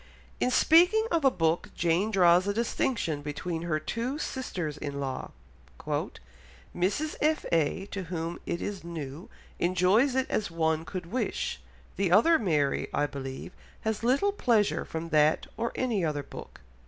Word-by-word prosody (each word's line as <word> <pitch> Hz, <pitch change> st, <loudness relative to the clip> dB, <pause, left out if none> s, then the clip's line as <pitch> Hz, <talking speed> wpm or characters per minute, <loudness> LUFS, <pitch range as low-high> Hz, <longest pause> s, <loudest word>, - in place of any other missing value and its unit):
In -, -, +2 dB
speaking 355 Hz, -, +5 dB
of 335 Hz, -3 st, +2 dB
a 270 Hz, -, +7 dB
book 165 Hz, -6 st, 0 dB
Jane 175 Hz, +5 st, +1 dB
draws 180 Hz, -2 st, +4 dB
a 200 Hz, -, 0 dB
distinction 220 Hz, -, -1 dB
between 160 Hz, +3 st, -4 dB
her 165 Hz, -2 st, -1 dB
two 235 Hz, -, -3 dB
sisters 185 Hz, -, -4 dB
in 145 Hz, -1 st, -5 dB
law, 135 Hz, -2 st, -4 dB, 1.5 s
"Mrs. 200 Hz, -, 0 dB
F. 310 Hz, +1 st, +2 dB
A., 165 Hz, +4 st, +1 dB
to 190 Hz, -2 st, -4 dB
whom 170 Hz, 0 st, -4 dB
it 170 Hz, -, -2 dB
is 200 Hz, -3 st, -4 dB
new, 160 Hz, -2 st, -7 dB, 0.3 s
enjoys 185 Hz, +9 st, +3 dB
it 265 Hz, 0 st, +2 dB
as 210 Hz, -, -1 dB
one 160 Hz, -1 st, 0 dB
could 180 Hz, 0 st, -6 dB
wish, 220 Hz, -, -2 dB, 0.4 s
the 190 Hz, -2 st, +1 dB
other 315 Hz, -, +6 dB
Mary, 150 Hz, -9 st, +1 dB
I 145 Hz, -, +1 dB
believe, 135 Hz, +1 st, -6 dB, 0.3 s
has 220 Hz, -1 st, -2 dB
little 275 Hz, +12 st, +3 dB
pleasure 230 Hz, -, +1 dB
from 165 Hz, +1 st, -5 dB
that 155 Hz, -1 st, +3 dB
or 230 Hz, +2 st, -2 dB
any 235 Hz, -7 st, 0 dB
other 150 Hz, -3 st, -1 dB
book." -, -, -11 dB
180 Hz, 155 wpm, -28 LUFS, 160-235 Hz, 1.5 s, a